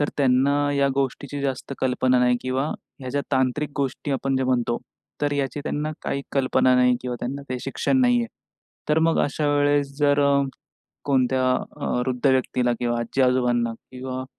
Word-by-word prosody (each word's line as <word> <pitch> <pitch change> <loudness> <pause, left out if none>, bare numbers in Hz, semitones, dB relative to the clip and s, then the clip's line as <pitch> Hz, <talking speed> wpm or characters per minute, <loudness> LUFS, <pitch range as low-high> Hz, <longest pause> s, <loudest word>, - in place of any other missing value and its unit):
तर 145 - +1
त्यांना 135 0 +3 0.2
या 140 -1 +2
गोष्टीची 140 +1 -2
जास्त 135 0 -3
कल्पना 130 0 +2
नाही 125 0 +3
किंवा 130 +2 -1 0.3
ह्या 130 - -6
ज्या 145 +2 0
तांत्रिक 130 +3 +1
गोष्टी 140 +1 -2
आपण 135 0 0
जे 130 - 0
म्हणतो, 120 -2 +1 0.4
तर 145 0 +1
याची 140 0 -2
त्यांना 150 +1 -2
काही 140 - -2
कल्पना 130 -1 +3
नाही 125 0 +4
किंवा 125 -1 -4
त्यांना 140 +3 -4
काही 125 0 -3
शिक्षण 200 - 0
नाही 245 -1 +4
आहे. 235 - -2 0.6
तर 150 +1 +3
मग 165 - +2
अशावेळेस 145 -1 +1
जर 145 -1 +3
अ, 140 0 +4 0.6
कोणत्या 130 -2 +2 0.4
अ, - - -2 0.2
वृद्ध 130 +1 -1
व्यक्तीला 125 -2 +1
किंवा 120 -1 0
आजी-आजोबांना 120 -1 +1
किंवा 130 +2 -7
130 Hz, 165 wpm, -24 LUFS, 125-145 Hz, 0.6 s, नाही